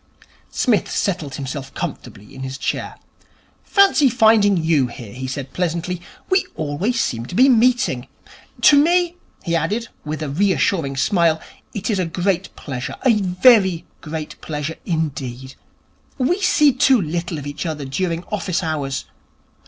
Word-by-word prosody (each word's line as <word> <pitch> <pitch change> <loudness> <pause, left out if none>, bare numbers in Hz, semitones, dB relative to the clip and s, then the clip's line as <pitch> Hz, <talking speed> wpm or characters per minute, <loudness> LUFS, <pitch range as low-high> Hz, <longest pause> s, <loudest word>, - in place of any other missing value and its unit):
Psmith 235 -6 +1
settled 170 -9 -2
himself 135 0 -5
comfortably 135 - -6
in 130 - -9
his 130 0 -5
chair. - - -3 0.7
'Fancy 390 -9 +4
finding 220 -4 +4
you 160 -5 +2
here,' 115 -3 -10
he 130 +1 -5
said 130 0 -5
pleasantly. 175 0 -2 0.3
'We 375 - +4
seem - - -8
always 170 +11 -1 0.2
to - - -7
be 260 +5 +6
meeting. 245 - +3 0.5
To 285 -1 +7
me,' 350 +1 +2 0.3
he 170 - -1
added, 205 +8 -1
with 155 +1 -4
a 150 - -3
reassuring 155 -3 +1
smile, 165 +1 +2 0.4
'it 205 +2 -2
is 200 - 0
a 185 - +1
great 180 +2 -1
pleasure. 130 -3 -5
A 250 - +6
very 190 -2 +4 0.2
great 155 -1 -6
pleasure 150 +1 -4
indeed. 135 -6 -3 0.6
We 320 +9 +1
see 300 -7 +4
too 260 0 +4
little 170 -1 -3
of 145 - -7
each 145 +4 -4
other 150 -3 -4
during 165 +5 -2
office 190 -3 -1
hours. 145 -4 -2
170 Hz, 145 wpm, -20 LUFS, 145-215 Hz, 0.7 s, To